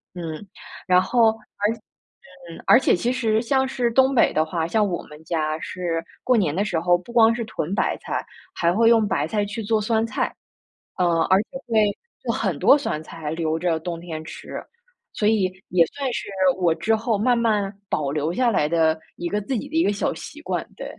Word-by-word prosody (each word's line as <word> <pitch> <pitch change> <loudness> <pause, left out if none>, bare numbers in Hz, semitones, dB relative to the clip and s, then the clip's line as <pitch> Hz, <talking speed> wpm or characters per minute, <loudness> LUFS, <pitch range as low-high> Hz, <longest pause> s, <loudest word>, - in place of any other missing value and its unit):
嗯， 170 +2 -6 0.4
然 180 0 +6
后 225 +3 +4 0.3
而 210 - +3
且 230 - -12 0.9
而 - - +8
且 - - +3
其 235 +8 0
实 225 -4 +1
像 265 +2 +1
是 250 -3 -1
东 265 +2 +4
北 - - +4
的 155 - +3
话， 165 -1 -2
像 215 +3 +2
我 175 - -3
们 150 +1 -14
家 155 -2 -1
是 170 -2 -3 0.2
过 255 - +3
年 170 -8 +1
的 200 - +1
时 175 -6 -1
候， 175 +1 +3
不 210 +7 -13
光 230 -1 +6
是 235 -1 -3
囤 200 -5 -4
白 - - +1
菜， - - -4 0.3
还 170 0 +2
会 230 +3 +4
用 225 -2 +4
白 150 -5 0
菜 205 +4 0
去 210 +3 -5
做 220 +1 +1
酸 225 +1 +1
菜。 - - -2 0.6
呃， 170 -2 +2
而 190 +2 +5
且 - - -56 0.2
会 215 -3 +2 0.3
做 - - -1
很 - - -1
多 280 - +6
酸 215 - -3
菜 155 -1 -6
留 160 -1 -1
着 165 -2 0
冬 170 0 -5
天 160 -2 -6
吃， - - -7 0.5
所 210 - 0
以 215 -4 +2 0.2
也 175 -2 +4
算 275 -3 -4
是 - - -4 0.3
我 175 -3 +2
之 220 +6 0
后 220 -1 0
慢 240 +3 +2
慢 210 -4 +1 0.2
保 140 -2 -1
留 155 +2 -1
下 240 +4 +2
来 150 -7 +2
的 160 -1 +2 0.2
一 175 0 -4
个 210 - 0
自 255 +5 -2
己 285 - -6
的 315 - -7
一 - - +4
个 205 - +2
小 - - -1
习 - - -10
惯， - - -3
对。 - - -7
200 Hz, 230 characters per minute, -23 LUFS, 165-230 Hz, 0.9 s, 而